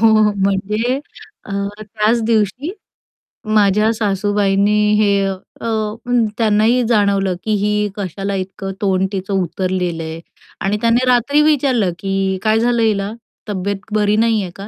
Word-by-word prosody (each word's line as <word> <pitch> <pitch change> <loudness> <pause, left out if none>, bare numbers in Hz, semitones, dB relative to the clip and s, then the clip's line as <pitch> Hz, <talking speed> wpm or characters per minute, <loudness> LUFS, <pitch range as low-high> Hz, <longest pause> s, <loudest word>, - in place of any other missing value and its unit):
हो 225 - +5 0.3
म्हणजे 205 +6 0 0.5
अ, 195 - -8 0.3
त्याच 215 +2 0
दिवशी 230 - 0 0.8
माझ्या 210 +1 +4
सासूबाईंनी 205 0 +1
हे 200 -1 +3
अ, 195 +4 -7 0.7
त्यांनाही 225 +2 +3
जाणवलं 200 -4 +2
की 220 - -2
ही 210 0 +1
कशाला 195 0 -4
इतकं 190 +1 -5
तोंड 190 -1 +1
तिचं 195 0 -4
उतरलेलं 180 -1 -2
आहे 160 +1 -6 0.4
आणि 200 +2 0
त्याने 235 +2 +3
रात्री 250 +4 +3
विचारलं 265 -10 +2
की 195 0 -1
काय 220 0 +3
झालं 235 0 +1
हिला 205 -2 +1 0.4
तब्येत 200 0 -2 0.2
बरी 210 0 +2
नाहीये 220 -4 +1
का? 195 +1 -8
205 Hz, 125 wpm, -18 LUFS, 195-225 Hz, 0.8 s, हो